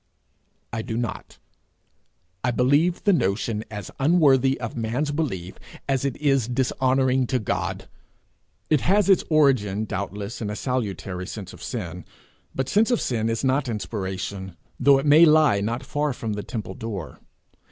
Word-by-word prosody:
I 115 Hz, -, -2 dB
do 110 Hz, 0 st, -4 dB
not. 120 Hz, -4 st, -5 dB, 1.1 s
I 125 Hz, -, +2 dB
believe 145 Hz, +9 st, +2 dB
the 200 Hz, -, +4 dB
notion 105 Hz, -, 0 dB
as 105 Hz, -3 st, -7 dB
unworthy 135 Hz, -4 st, +4 dB
of 115 Hz, -3 st, -5 dB
man's 120 Hz, +6 st, -1 dB
belief, 95 Hz, -, -3 dB, 0.3 s
as 135 Hz, -2 st, 0 dB
it 135 Hz, -, -2 dB
is 135 Hz, -6 st, +2 dB
dishonouring 130 Hz, 0 st, +1 dB
to 130 Hz, -, +1 dB
God. 110 Hz, -, -3 dB, 0.8 s
It 150 Hz, -, +4 dB
has 200 Hz, +2 st, +3 dB
its 190 Hz, -, +4 dB
origin 125 Hz, -10 st, +3 dB
doubtless 100 Hz, +2 st, -5 dB
in 105 Hz, -, -2 dB
a 105 Hz, -, -4 dB
salutary 100 Hz, -, -3 dB
sense 100 Hz, -4 st, -7 dB
of -, -, -13 dB
sin; 90 Hz, -7 st, -5 dB, 0.5 s
but 135 Hz, -1 st, -1 dB
sense 215 Hz, -, +3 dB
of 245 Hz, -, +2 dB
sin 115 Hz, -2 st, -1 dB
is 115 Hz, +2 st, -2 dB
not 135 Hz, 0 st, +1 dB
inspiration, 95 Hz, -3 st, -4 dB, 0.2 s
though 140 Hz, +1 st, +6 dB
it 135 Hz, -, -2 dB
may 150 Hz, +3 st, +7 dB
lie 155 Hz, -10 st, +5 dB
not 115 Hz, +5 st, -2 dB
far 145 Hz, +1 st, -1 dB
from 115 Hz, -3 st, -4 dB
the 105 Hz, -, -3 dB
temple 105 Hz, -4 st, -6 dB
door. 100 Hz, -7 st, -6 dB
120 Hz, 155 wpm, -24 LUFS, 105-140 Hz, 1.1 s, may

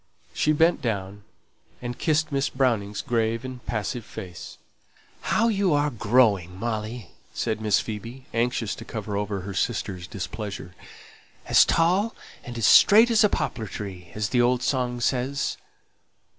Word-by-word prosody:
She 155 Hz, -, +2 dB
bent 165 Hz, +3 st, +3 dB
down 100 Hz, -3 st, -3 dB, 0.5 s
and 120 Hz, 0 st, -5 dB
kissed 155 Hz, +1 st, 0 dB
Miss 140 Hz, 0 st, 0 dB
Browning's 110 Hz, -6 st, 0 dB
grave 115 Hz, +1 st, 0 dB
and 130 Hz, -1 st, -7 dB
passive 115 Hz, +1 st, -3 dB
face. 90 Hz, -4 st, -9 dB, 0.6 s
"How 230 Hz, -, +2 dB
you 200 Hz, -6 st, +2 dB
are 145 Hz, 0 st, +1 dB
growing, 105 Hz, -6 st, +2 dB
Molly!" 110 Hz, -2 st, -4 dB, 0.2 s
said 110 Hz, -2 st, -2 dB
Miss 105 Hz, -2 st, +3 dB
Phoebe, 115 Hz, +4 st, -7 dB
anxious 115 Hz, -2 st, 0 dB
to -, -, -8 dB
cover 105 Hz, -2 st, -5 dB
over 100 Hz, -1 st, -2 dB
her 100 Hz, +2 st, -6 dB
sister's 95 Hz, -3 st, -2 dB
displeasure. 100 Hz, -1 st, -6 dB, 0.7 s
"'As -, -, +6 dB
tall 185 Hz, +7 st, +2 dB, 0.3 s
and 120 Hz, -1 st, -7 dB
as 115 Hz, -, 0 dB
straight 220 Hz, +3 st, +7 dB
as 220 Hz, -2 st, +5 dB
a 210 Hz, -, +5 dB
poplar 115 Hz, -, -2 dB
tree!' 95 Hz, -3 st, -7 dB
as 105 Hz, 0 st, -1 dB
the 125 Hz, -1 st, +3 dB
old 125 Hz, +1 st, +2 dB
song 125 Hz, -2 st, 0 dB
says." 130 Hz, +4 st, -1 dB
115 Hz, 145 wpm, -25 LUFS, 105-130 Hz, 0.7 s, straight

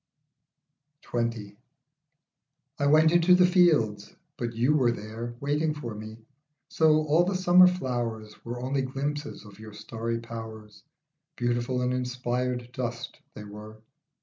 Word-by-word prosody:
XX. 115 Hz, -4 st, -3 dB, 1.2 s
I 140 Hz, -, +1 dB
WENT 155 Hz, +2 st, +5 dB
into 175 Hz, +1 st, +5 dB
the 180 Hz, 0 st, +5 dB
fields, 155 Hz, -, +2 dB, 0.2 s
but 120 Hz, -3 st, -4 dB
you 125 Hz, +6 st, +2 dB
were 125 Hz, -5 st, +3 dB
there 115 Hz, +2 st, -7 dB
Waiting 150 Hz, +2 st, 0 dB
for 120 Hz, -7 st, -6 dB
me, 110 Hz, +1 st, -9 dB, 0.5 s
so 155 Hz, -1 st, +3 dB
all 155 Hz, +3 st, +3 dB
the 190 Hz, +2 st, -1 dB
summer 185 Hz, 0 st, +6 dB
flowers 120 Hz, -10 st, -3 dB
Were 120 Hz, +1 st, -6 dB
only 135 Hz, +2 st, -1 dB
glimpses 145 Hz, +1 st, -4 dB
of 100 Hz, 0 st, -14 dB
your 110 Hz, -1 st, -11 dB
starry 115 Hz, +2 st, -4 dB
powers; 110 Hz, -2 st, -9 dB, 0.5 s
Beautiful 120 Hz, +1 st, -1 dB
and 125 Hz, 0 st, 0 dB
inspired 125 Hz, -1 st, -3 dB
dust 120 Hz, -1 st, -5 dB, 0.2 s
they 105 Hz, -, -8 dB
were. 105 Hz, +1 st, -11 dB
125 Hz, 130 wpm, -27 LUFS, 115-150 Hz, 1.2 s, summer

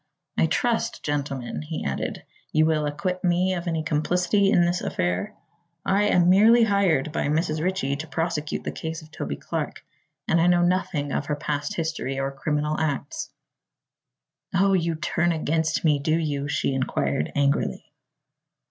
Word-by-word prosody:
"I 160 Hz, -, +3 dB
trust, 230 Hz, +5 st, 0 dB
gentlemen," 135 Hz, -, -3 dB
he 75 Hz, -, -5 dB
added, -, -, -3 dB, 0.3 s
"you 155 Hz, 0 st, +4 dB
will 155 Hz, -2 st, +1 dB
acquit 180 Hz, +5 st, -3 dB
me 180 Hz, +1 st, +2 dB
of 175 Hz, -1 st, -4 dB
any 165 Hz, -2 st, -1 dB
complicity 180 Hz, +6 st, +2 dB
in 175 Hz, -3 st, +4 dB
this 175 Hz, +1 st, 0 dB
affair. 90 Hz, +3 st, -2 dB, 0.5 s
I 200 Hz, +2 st, +3 dB
am 180 Hz, -4 st, +4 dB
merely 220 Hz, +6 st, +6 dB
hired 190 Hz, -9 st, +2 dB
by 155 Hz, -, -1 dB
Mrs. 155 Hz, +1 st, 0 dB
Ritchie 155 Hz, -7 st, 0 dB
to 160 Hz, +2 st, -6 dB
prosecute 155 Hz, +1 st, -2 dB
the -, -, -3 dB
case 160 Hz, 0 st, -5 dB
of 155 Hz, -, -16 dB
Toby 70 Hz, -, -4 dB
Clark -, -, -5 dB, 0.4 s
and 170 Hz, -, +3 dB
know 175 Hz, 0 st, +4 dB
nothing 175 Hz, -5 st, 0 dB
of -, -, -2 dB
her 150 Hz, -, 0 dB
past 145 Hz, +5 st, -3 dB
history 160 Hz, -5 st, -2 dB
or 135 Hz, 0 st, -1 dB
criminal 150 Hz, +2 st, -1 dB
acts." 155 Hz, -, -2 dB, 1.3 s
"Oh, 195 Hz, +2 st, +4 dB
you 170 Hz, -3 st, +1 dB
turn 175 Hz, +2 st, 0 dB
against 160 Hz, 0 st, 0 dB
me, 150 Hz, -2 st, +4 dB
do 155 Hz, +3 st, +1 dB
you?" 145 Hz, -3 st, -2 dB
she 140 Hz, -1 st, 0 dB
inquired 75 Hz, -, -1 dB
angrily. 140 Hz, 0 st, 0 dB
160 Hz, 155 wpm, -25 LUFS, 145-180 Hz, 1.3 s, merely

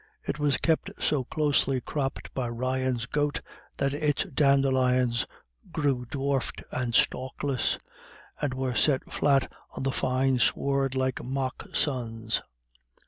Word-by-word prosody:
It -, -, -3 dB
was 145 Hz, -3 st, +3 dB
kept 160 Hz, -1 st, +1 dB
so 145 Hz, -4 st, +1 dB
closely 145 Hz, -3 st, +2 dB
cropped 135 Hz, +2 st, -3 dB
by 130 Hz, -2 st, -1 dB
the 120 Hz, -, -4 dB
Ryans' 130 Hz, 0 st, -1 dB
goat 145 Hz, +2 st, 0 dB, 0.4 s
that 140 Hz, 0 st, +1 dB
its 145 Hz, -1 st, +1 dB
dandelions 130 Hz, -4 st, +3 dB, 0.4 s
grew 135 Hz, -6 st, 0 dB
dwarfed 140 Hz, -1 st, -1 dB
and 120 Hz, -2 st, -1 dB
stalkless, 130 Hz, 0 st, +1 dB, 0.6 s
and 145 Hz, -3 st, 0 dB
were 130 Hz, -1 st, -1 dB
set 130 Hz, +4 st, +2 dB
flat 140 Hz, -2 st, +2 dB, 0.3 s
in -, -, -2 dB
the 135 Hz, -, +1 dB
fine 130 Hz, 0 st, +1 dB
sward 135 Hz, 0 st, +1 dB
like 130 Hz, -1 st, 0 dB
mock 130 Hz, 0 st, -3 dB
suns. 115 Hz, -5 st, 0 dB
130 Hz, 130 wpm, -28 LUFS, 125-140 Hz, 0.6 s, was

